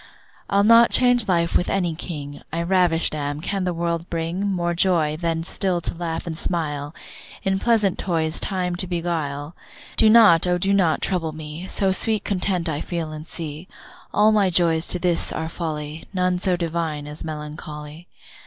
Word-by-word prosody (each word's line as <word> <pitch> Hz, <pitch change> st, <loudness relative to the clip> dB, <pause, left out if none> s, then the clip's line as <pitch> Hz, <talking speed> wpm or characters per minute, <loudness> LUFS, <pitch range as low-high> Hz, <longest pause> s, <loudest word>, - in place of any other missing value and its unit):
I'll 200 Hz, 0 st, +3 dB
not 230 Hz, +2 st, +7 dB
change 245 Hz, -3 st, +5 dB
life 170 Hz, -3 st, +1 dB
with 175 Hz, -, +2 dB
any 180 Hz, -4 st, 0 dB
king, 145 Hz, -4 st, -7 dB
I 165 Hz, +2 st, -2 dB
ravisht 175 Hz, -3 st, +3 dB
am: 145 Hz, -1 st, -3 dB
can 190 Hz, +3 st, -2 dB
the 180 Hz, -, 0 dB
world 170 Hz, 0 st, -2 dB
bring 170 Hz, +4 st, -2 dB
More 175 Hz, -2 st, -1 dB
joy, 170 Hz, -4 st, +1 dB
than 165 Hz, 0 st, -2 dB
still 185 Hz, 0 st, 0 dB
to -, -, -2 dB
laugh 165 Hz, -1 st, -4 dB
and 165 Hz, -2 st, -4 dB
smile, 150 Hz, -3 st, -3 dB, 0.5 s
In 190 Hz, -1 st, 0 dB
pleasant 215 Hz, -5 st, +2 dB
toys 160 Hz, -3 st, 0 dB
time 180 Hz, -2 st, -2 dB
to 185 Hz, -, -4 dB
beguile? 165 Hz, -4 st, -3 dB, 0.4 s
Do 220 Hz, -, +6 dB
not, 210 Hz, -7 st, +6 dB
O 180 Hz, 0 st, +2 dB
do 195 Hz, +3 st, +1 dB
not 180 Hz, -5 st, +2 dB
trouble 170 Hz, -4 st, -1 dB
me, 155 Hz, +3 st, -8 dB
So 195 Hz, 0 st, +1 dB
sweet 215 Hz, +2 st, 0 dB
content 185 Hz, -3 st, 0 dB
I 150 Hz, -2 st, -2 dB
feel 165 Hz, -3 st, -4 dB
and 155 Hz, +1 st, -8 dB
see. 160 Hz, 0 st, -6 dB, 0.4 s
All 210 Hz, +1 st, +4 dB
my 205 Hz, -3 st, +3 dB
joys 165 Hz, -2 st, +2 dB
to -, -, 0 dB
this 175 Hz, -1 st, 0 dB
are 160 Hz, -, -3 dB
folly, 155 Hz, -2 st, -5 dB
None 180 Hz, -1 st, +1 dB
so 180 Hz, -1 st, +1 dB
divine 165 Hz, -3 st, -3 dB
as 150 Hz, +1 st, -7 dB
melancholy. 150 Hz, +1 st, -8 dB
170 Hz, 175 wpm, -22 LUFS, 160-185 Hz, 0.5 s, not